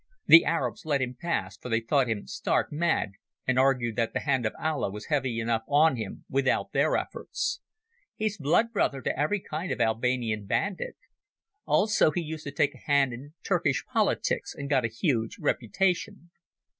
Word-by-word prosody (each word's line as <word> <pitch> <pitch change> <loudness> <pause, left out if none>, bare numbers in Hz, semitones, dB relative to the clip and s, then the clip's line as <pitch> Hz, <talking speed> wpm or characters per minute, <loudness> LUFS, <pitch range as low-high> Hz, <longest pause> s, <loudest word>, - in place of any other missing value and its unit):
The 165 - +9
Arabs 165 - -1
let 145 -3 +1
him 125 -1 -2
pass, 105 - -3
for 125 - -8
they 115 -1 +2
thought 125 +2 +1
him 110 -3 -2
stark - - -1
mad 160 - 0 0.3
and 130 0 +2
argued 125 -4 +2
that 115 -1 0
the - - -1
hand 130 -5 +1
of - - -4
Allah 155 -8 -1
was 105 +2 -8
heavy 130 -5 0
enough 115 -1 0
on 150 +1 +4
him 110 -4 -6
without 135 0 0
their - - +2
efforts. - - -3 0.6
He's 215 -1 -1
blood 170 +11 +2
brother 140 - 0
to - - -1
every 155 +9 0
kind 165 +3 -4
of - - -2
Albanian 115 -2 0
bandit. 200 - -1 0.7
Also 210 -5 +4
he 165 +3 -2
used 160 -1 -6
to 145 - -4
take 145 0 +1
a - - -15
hand 140 -3 +3
in 140 +6 -10
Turkish 170 -8 0
politics, - - 0
and 140 +1 -6
got 130 -4 +3
a - - +2
huge 115 - -1
reputation. 175 - -1
135 Hz, 180 wpm, -27 LUFS, 115-160 Hz, 0.7 s, The